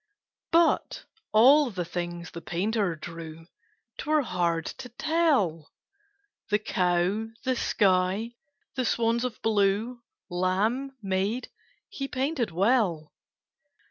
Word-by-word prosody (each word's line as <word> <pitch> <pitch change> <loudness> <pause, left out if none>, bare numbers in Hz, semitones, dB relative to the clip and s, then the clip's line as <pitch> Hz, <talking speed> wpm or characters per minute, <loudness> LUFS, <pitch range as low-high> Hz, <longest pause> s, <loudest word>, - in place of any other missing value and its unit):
But 335 0 +2 0.3
all 270 +6 +6
the 185 -5 -4
things 175 0 -5
the 170 - -8
painter 195 +1 -1
drew 165 0 -9 0.5
'Twere 305 0 +2
hard 170 -6 0 0.2
to 250 - -9
tell 250 - +1 0.8
The 210 - +3
cow, 185 +1 0 0.2
the 255 0 +1
sky, 195 +2 +1 0.4
the 255 - 0
swans 230 +1 +1
of 250 -3 -4
blue, 220 +3 +1 0.3
Lamb, 210 +9 0
maid, 195 +5 -1 0.4
he 275 - -5
painted 265 -1 -1
well. 180 -4 +1
210 Hz, 105 wpm, -27 LUFS, 175-250 Hz, 0.8 s, all